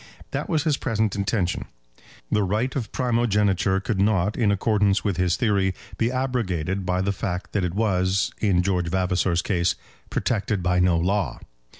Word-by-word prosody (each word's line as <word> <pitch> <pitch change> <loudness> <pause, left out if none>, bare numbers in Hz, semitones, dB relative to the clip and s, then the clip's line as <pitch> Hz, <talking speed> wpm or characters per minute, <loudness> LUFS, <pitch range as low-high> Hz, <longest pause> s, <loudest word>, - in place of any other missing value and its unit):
That - - -3
was 155 -4 +1
his 150 -4 +1
present 110 -4 0
intention. 100 -2 -1 0.7
The 105 - +3
right 105 +7 0
of 125 -6 -3
primogeniture 105 -6 +1
could 95 0 -1
not, 105 -1 +2
in 115 -4 +2
accordance 100 -1 +2
with 100 -5 -1
his 90 -1 +2
theory, 100 -6 +1 0.2
be 115 +2 +2
abrogated 100 -9 -1
by 90 0 +1
the 100 - +1
fact 95 -2 -4
that 100 - 0
it 90 0 -2
was, 95 -3 +1
in 95 -4 +2
George 90 -2 0
Vavasor's 90 -1 +1
case, 90 -3 +1 0.3
protected 105 -4 -1
by 90 -1 +2
no 90 -1 +3
law. 95 +4 0
100 Hz, 165 wpm, -24 LUFS, 90-110 Hz, 0.7 s, The